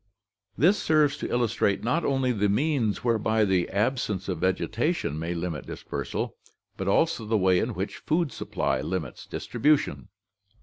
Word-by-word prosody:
This 180 - +4
serves 155 -3 +3
to - - -4
illustrate 115 -4 +1
not 160 +9 +1
only 135 -2 +1
the 105 -3 +1
means 120 -1 +1
whereby 110 -2 +2
the 95 -3 +1
absence 105 -2 -1
of 90 -4 -2
vegetation 105 - 0
may 85 +2 -3
limit 85 -2 -4
dispersal, - - -4 0.4
but 95 - -4
also 140 +5 +2
the 110 +1 +1
way 95 -2 +3
in - - -2
which - - -4
food 160 -2 0
supply - - -1
limits 85 -8 -4
distribution. 140 -3 0
110 Hz, 145 wpm, -27 LUFS, 95-140 Hz, 0.4 s, This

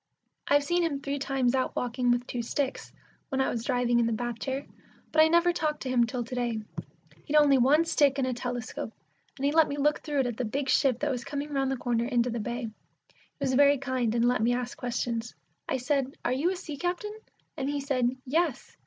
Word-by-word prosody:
I've 285 0 +4
seen 345 +5 +1
him 315 -5 0
three 280 +1 -3
times 265 -3 +1
out 260 -1 0
walking 245 0 0
with 245 0 +2
two 245 - -3
sticks, 265 +3 -3 0.4
when 270 -3 -1
I 265 - +2
was 230 -2 -3
driving 245 -1 +2
in 235 - +3
the - - 0
bath 240 +1 -3
chair, 270 +1 -3 0.5
but 315 - +5
I 315 - +7
never 340 +2 +4
talked 305 -3 -1
to 260 - -4
him 240 -2 +3
till 240 +2 -3
to 230 - -9
day. 240 -3 -1 0.7
He'd 300 - -2
only 290 -3 +6
one 295 +7 +4
stick 285 -4 +3
and 270 - +1
a 255 - -1
telescope, 245 -2 -4 0.5
and 275 - -2
he 285 - +3
let 320 0 +5
me 285 - -4
look 295 +1 +2
through 290 -2 0
it - - -1
at 240 -2 -3
the 255 - -1
big 265 +4 -2
ship 260 -2 +3
that 295 -1 +1
was 250 -2 -3
coming 290 +2 -4
round 270 -1 +1
the 270 - -1
corner 235 -1 0
into 245 -1 +1
the 235 - -2
bay. 240 +3 -3
He 225 -2 -5 0.7
was 260 - 0
very 285 +2 +5
kind, 255 -4 -1
and 235 0 +3
let 245 -2 +2
me 240 +2 +3
ask 250 +1 -4
questions. 240 -1 -3 0.3
I - - +1
said, 270 +1 -1
"Are 245 - +2
you 290 +7 +1
a 380 - -1
sea 315 -5 -7
captain?" 360 +6 -2 0.4
and 275 -3 -2
he 290 0 -1
said, 265 -3 +1 0.2
"Yes." 310 +1 -1
265 Hz, 235 wpm, -28 LUFS, 245-285 Hz, 0.7 s, I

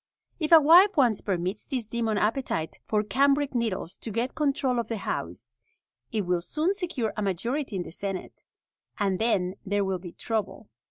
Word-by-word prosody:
If 310 -1 -1
a 330 - +10
wife 350 +6 +6
once 240 -7 +3
permits 185 +1 -2
this 255 -5 -2
demon 225 -1 -1
appetite 210 -7 -1
for 210 -1 +1
cambric 280 +5 +2
needles 225 -8 -2
to - - -6
get 235 +4 -2
control 275 -4 0
of 230 - -2
the 225 - -3
house, - - -4 0.6
it 220 -3 0
will 180 -2 0
soon 305 - 0
secure 340 - -3
a 215 - -3
majority 230 - -2
in 180 - -1
the - - -10
senate, 195 +2 -6 0.5
and 195 -3 0
then 195 -5 +1
there 205 0 0
will 190 -1 -1
be 175 -1 -9
trouble. 220 -2 -3
225 Hz, 175 wpm, -27 LUFS, 195-275 Hz, 0.6 s, a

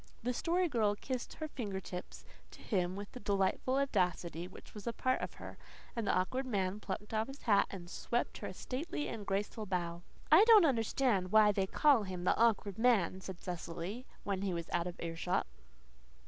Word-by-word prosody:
The 250 +1 0
Story 350 +7 +1
Girl 220 -8 +2
kissed 255 +3 -4
her 310 - -4
fingertips 195 -9 -6 0.2
to - - -14
him 185 -4 0
with 200 0 -7
the 250 - -8
delightful 200 +5 +1
audacity 180 - 0
which 185 - -14
was 210 0 -9
a 235 - 0
part 255 +2 0
of - - -5
her; - - -10 0.4
and 230 -3 -2
the - - +4
Awkward 255 +9 0
Man 200 -3 -1
plucked 210 +1 -5
off 220 0 +1
his 270 +1 -10
hat 205 -4 +4
and 180 -3 -8
swept 235 +6 -2
her - - -4
a - - -6
stately 295 +3 -3
and 210 -3 -6
graceful 205 +2 -2
bow. 170 -2 -2 0.3
"I 325 +7 +9
don't 440 -6 +8
understand 225 - +1
why 215 -1 +7
they 195 -1 0
call 280 +2 +4
him 185 -3 -5
the - - +3
awkward 220 -3 +2
man," 205 -6 +3
said 185 -1 -7
Cecily, 180 +7 -5 0.2
when 195 -2 -2
he 190 -3 -1
was 170 -1 -5
out 170 - +1
of 175 - -7
earshot. 170 +2 -1
205 Hz, 190 wpm, -34 LUFS, 185-250 Hz, 0.4 s, I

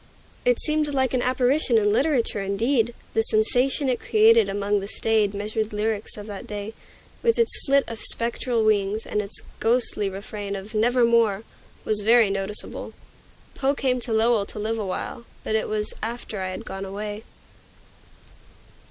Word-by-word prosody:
It - - +3
seemed 305 -2 0
like 260 -1 +1
an 255 - +1
apparition 255 0 +2
in 205 -1 +3
literature, 260 -6 +1
indeed; 230 +4 0 0.2
the 225 - +3
sensation 245 +6 +1
it 250 -2 0
created 450 +1 +4
among 205 +1 0
the 195 - -6
staid, 215 -1 +1
measured 215 +1 -3
lyrics 210 0 -2
of 205 - -8
that 205 -2 -8
day, 210 +1 -6 0.5
with 465 -1 +2
its 465 -1 +2 0.2
flit 275 0 +4
of 230 -1 -6
spectral 235 0 +3
wings, 210 0 +1
and 210 - -1
its 200 0 -7 0.2
ghostly 225 -3 +1
refrain 200 +1 -6
of 195 +3 -8
"Nevermore!" 230 -2 +3 0.4
was 215 -1 +1
very 225 -1 +5
noticeable. 195 +1 -3 0.6
Poe 275 +1 0
came 255 -2 0
to 240 - -5
Lowell 220 -1 +3
to - - -8
live 220 +2 -2
awhile, 215 +4 -4 0.2
but - - -3
it 220 - 0
was 210 0 -2
after 225 -2 -4
I 185 0 -2
had 185 - -7
gone 195 0 -6
away. 205 +2 -6
220 Hz, 160 wpm, -24 LUFS, 205-245 Hz, 0.6 s, very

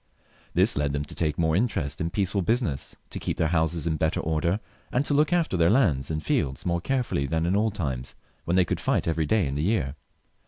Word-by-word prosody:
This - - +5
led 75 -1 0
them 70 0 -2
to - - -7
take 75 -3 -1
more 80 -1 +2
interest 95 - -1
in 85 - 0
peaceful 95 +1 0
busi 115 +8 +1
ness, 70 - -3 0.2
to - - -5
keep - - -3
their 80 - +1
houses 80 -1 0
in 80 -2 0
better 80 +1 0
order, 85 +5 0 0.3
and 130 +3 +1
to 145 - 0
look 150 +3 +3
after 170 - +1
their 85 -1 +4
lands 90 - +2
and 80 -1 -2
fields 65 -2 -1
more 85 -1 0
carefully 125 - -1
than 80 +4 0
in 90 +3 +1
old 105 0 +1
times, 65 -9 -3 0.3
when 85 - 0
they 90 -1 +4
could - - -2
fight - - 0
every 80 -2 0
day 105 +1 +2
in 70 - -2
the 70 - -1
year. 80 -7 0
85 Hz, 235 wpm, -26 LUFS, 75-105 Hz, 0.3 s, This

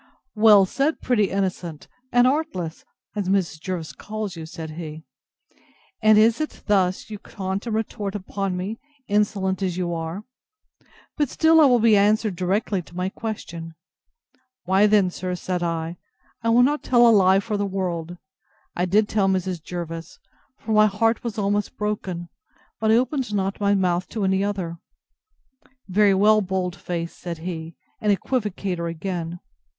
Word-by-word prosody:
Well 210 -3 +7
said, 280 +10 0
pretty 215 -6 +1
innocent 180 -5 -3 0.2
and 245 0 +5
artless! 255 - -1 0.3
as 200 -3 -2
Mrs. 185 -5 0
Jervis 170 -2 -4
calls 215 -3 -5
you, 160 -1 -7
said 160 -1 -7
he; 155 -1 -7 1.0
and 215 -1 +6
is 225 +6 +4
it 310 - -5
thus 190 0 +1
you 210 - -6
taunt 190 +3 -5
and 220 - -1
retort 210 -2 -3
upon 195 -1 -3
me, 200 +5 -4 0.3
insolent 200 -2 0
as 180 -2 -1
you 175 -2 -1
are! 165 +4 -4 0.9
But 295 -4 +1
still 320 +2 +5
I - - +8
will 250 -3 +5
be 225 -2 +5
answered 210 0 +3
directly 190 +2 0
to 175 - -17
my 180 +1 -1
question. 170 -7 -6 0.9
Why 190 +3 +4
then, 205 -3 +3
sir, 180 0 -4
said 180 0 -3
I, 165 0 -2 0.4
I 230 - 0
will 240 +2 +6
not 295 +3 +2
tell 240 -1 +5
a - - +7
lie 190 -2 +5
for 210 +1 -3
the 205 - 0
world: 175 -3 -3 0.6
I 175 - +1
did 205 +4 +3
tell 205 -3 +1
Mrs. 185 -2 -1
Jervis; 165 -1 -6 0.4
for 225 - -6
my 215 0 +6
heart 225 +3 +1
was 235 -2 -4
almost 205 0 -1
broken; 195 -5 -3 0.5
but 220 - +1
I 220 - +6
opened 255 -1 0
not 195 +1 -1
my 200 0 +3
mouth 180 -2 +1
to 215 - -3
any 190 +1 +2
other. 185 -5 -3 1.1
Very 200 +1 +4
well, 215 +2 +5
bold 185 -2 -2
face, 170 -3 -4
said 170 -2 -6
he, 165 -2 -5 0.3
and 210 - +2
equivocator 195 -5 -1
again! 170 0 -4
195 Hz, 160 wpm, -23 LUFS, 175-215 Hz, 1.1 s, I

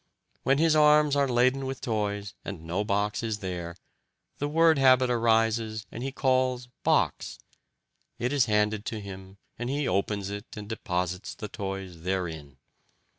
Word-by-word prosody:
When 135 +1 +2
his 160 +1 +4
arms 150 -1 +5
are 140 -1 +3
laden 130 +2 +2
with 135 -1 -4
toys 105 -3 -2
and 90 -5 -7
no 90 +5 -1
box 105 0 0
is 110 -2 -2
there, 90 -4 -5 0.6
the 145 - 0
word 160 0 +4
habit 130 -1 +5
arises 115 -1 +1
and 115 - -7
he 135 +1 -3
calls 130 -2 +1
'box'; - - +1 0.8
it 125 +3 -1
is 140 -4 +4
handed 105 0 +1
to 110 - -3
him, 95 -1 -10 0.2
and 120 +1 -3
he 140 +1 -1
opens 100 +1 -1
it 100 +2 -8
and 105 -1 -7
deposits 90 -4 -3
the 105 - -7
toys 95 -5 -6
therein. 80 -7 -3
110 Hz, 155 wpm, -28 LUFS, 95-130 Hz, 0.8 s, arms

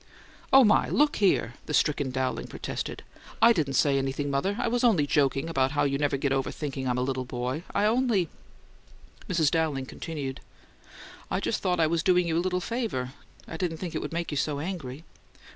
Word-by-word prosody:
"Oh, 270 0 +8
my! 210 -2 +4
Look 295 0 +2
here!" 185 - +2
the 150 - 0
stricken 145 -2 +1
Dowling 130 0 -2
protested. - - -5 0.4
"I 235 +1 +7
didn't 145 -8 -1
say 140 +1 +3
anything, 135 +1 -2
mother. 190 +10 0
I 245 - 0
was 240 +1 0
just 180 - +3
joking 140 0 +2
about 135 -4 +1
how 145 - +2
you 140 -1 0
never 145 -1 +1
get 140 0 -1
over 135 0 0
thinking 135 -3 -4
I'm 125 0 0
a 125 - +1
little 130 0 -2
boy. 125 +4 -3
I 200 - +3
only 225 -5 +2 0.5
" - - -24
Mrs. 165 -5 +2
Dowling 155 -5 0
continued: 140 -2 -6 0.9
"I - - 0
just - - -1
thought 180 -2 0
I 160 - +5
was 165 +1 +1
doing 180 +1 +3
you 160 - 0
a 170 - +2
little 180 0 0
favour. 195 - -3 0.3
I 160 - -6
didn't 165 -2 -2
think 175 0 -5
it - - -2
would - - -5
make 170 0 -3
you 145 - -2
so 145 0 -1
angry." 155 -4 -5
155 Hz, 205 wpm, -27 LUFS, 135-180 Hz, 0.9 s, Oh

